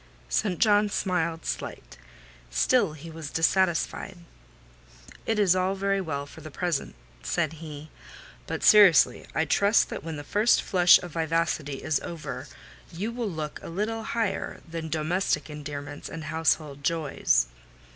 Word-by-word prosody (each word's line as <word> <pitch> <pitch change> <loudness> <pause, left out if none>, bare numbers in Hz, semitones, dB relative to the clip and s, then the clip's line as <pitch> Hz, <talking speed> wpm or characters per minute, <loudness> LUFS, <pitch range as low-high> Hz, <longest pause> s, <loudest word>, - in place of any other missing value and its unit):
St. 185 - 0
John 210 0 +4
smiled 170 -5 -1
slightly: - - -4 0.7
still 175 - +2
he 160 +2 -10
was 160 -2 -7
dissatisfied. 175 +2 +1 1.1
"It 225 - +1
is 195 -4 +4
all 185 +1 +1
very 195 0 0
well 140 -5 -3
for - - -13
the 155 - -8
present," 170 -1 -2 0.3
said 160 - -1
he; 155 -1 -9 0.6
"but - - -4
seriously, 205 -7 +6
I 160 - +2
trust 200 +8 +3
that - - -6
when 165 -1 -5
the 145 - -6
first 210 +10 +3
flush 180 -2 +6
of 175 - -7
vivacity 160 -3 -1
is 155 - +1
over, 145 -5 -6 0.4
you 195 +7 -3
will 235 -2 -3
look 155 -4 -5
a - - -8
little 215 +6 -2
higher 220 -3 -2
than 165 -1 -5
domestic 160 +2 -1
endearments 145 -1 -7
and 165 -1 -7
household 155 -2 0
joys." 145 - +1
165 Hz, 145 wpm, -27 LUFS, 155-195 Hz, 1.1 s, seriously